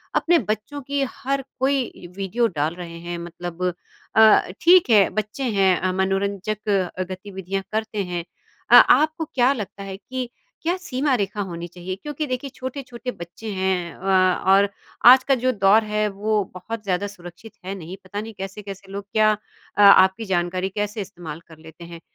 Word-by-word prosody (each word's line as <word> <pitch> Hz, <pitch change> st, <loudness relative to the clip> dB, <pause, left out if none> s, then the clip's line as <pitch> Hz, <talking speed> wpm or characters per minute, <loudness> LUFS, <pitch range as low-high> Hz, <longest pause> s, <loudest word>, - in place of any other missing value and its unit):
अपने 345 Hz, 0 st, +4 dB
बच्चों 220 Hz, +6 st, -4 dB
की 280 Hz, +1 st, -2 dB
हर 275 Hz, 0 st, -2 dB, 0.2 s
कोई 265 Hz, -9 st, -1 dB
वीडियो 220 Hz, +5 st, 0 dB
डाल 155 Hz, +4 st, 0 dB
रहे 170 Hz, -2 st, -8 dB
हैं 175 Hz, 0 st, -5 dB
मतलब 175 Hz, +1 st, -7 dB, 0.5 s
अ, 220 Hz, -1 st, +7 dB, 0.2 s
ठीक 350 Hz, -4 st, +6 dB
है, 205 Hz, -4 st, +6 dB
बच्चे 215 Hz, +5 st, -4 dB
हैं 195 Hz, -6 st, +3 dB
अ, 185 Hz, 0 st, 0 dB
मनोरंजक 200 Hz, +2 st, -1 dB, 0.4 s
गतिविधियाँ 190 Hz, 0 st, -5 dB
करते 215 Hz, -2 st, -2 dB
हैं। 175 Hz, -2 st, -4 dB, 0.5 s
अ, -, -, +8 dB
आपको 315 Hz, +1 st, +6 dB
क्या 255 Hz, -2 st, +2 dB
लगता 205 Hz, -4 st, -7 dB
है 195 Hz, -1 st, -7 dB
कि 250 Hz, +4 st, -5 dB, 0.3 s
क्या 345 Hz, +3 st, 0 dB
सीमा 280 Hz, -5 st, -1 dB
रेखा 205 Hz, -1 st, -2 dB
होनी 170 Hz, 0 st, -6 dB
चाहिए? 180 Hz, +2 st, -6 dB
क्योंकि 295 Hz, +7 st, -5 dB
देखिए 255 Hz, +2 st, -3 dB
छोटे-छोटे 255 Hz, -1 st, -6 dB
बच्चे 180 Hz, +5 st, -8 dB
हैं 185 Hz, -3 st, -1 dB
अ, 185 Hz, -1 st, +2 dB
और 200 Hz, +1 st, +5 dB, 0.4 s
आज 255 Hz, +1 st, +9 dB
का 270 Hz, -, +3 dB
जो 255 Hz, -, +3 dB
दौर 205 Hz, 0 st, +4 dB
है 210 Hz, 0 st, 0 dB
वो 210 Hz, +1 st, 0 dB
बहुत 210 Hz, +4 st, -6 dB
ज़्यादा 195 Hz, +1 st, -1 dB
सुरक्षित 185 Hz, +2 st, -12 dB
है 195 Hz, +1 st, -4 dB
नहीं, 180 Hz, +1 st, -8 dB
पता 205 Hz, +2 st, -5 dB
नहीं 225 Hz, 0 st, -8 dB
कैसे-कैसे 195 Hz, 0 st, -8 dB
लोग 200 Hz, 0 st, -6 dB
क्या 215 Hz, -1 st, +5 dB, 0.5 s
अ, -, -, +4 dB
आपकी 200 Hz, +2 st, +6 dB
जानकारी 180 Hz, +2 st, 0 dB
कैसे 210 Hz, +1 st, -2 dB
इस्तेमाल 170 Hz, -4 st, -8 dB
कर 160 Hz, -1 st, -15 dB
लेते 160 Hz, +2 st, -13 dB
हैं। 170 Hz, 0 st, -10 dB
200 Hz, 170 wpm, -23 LUFS, 185-235 Hz, 0.5 s, आज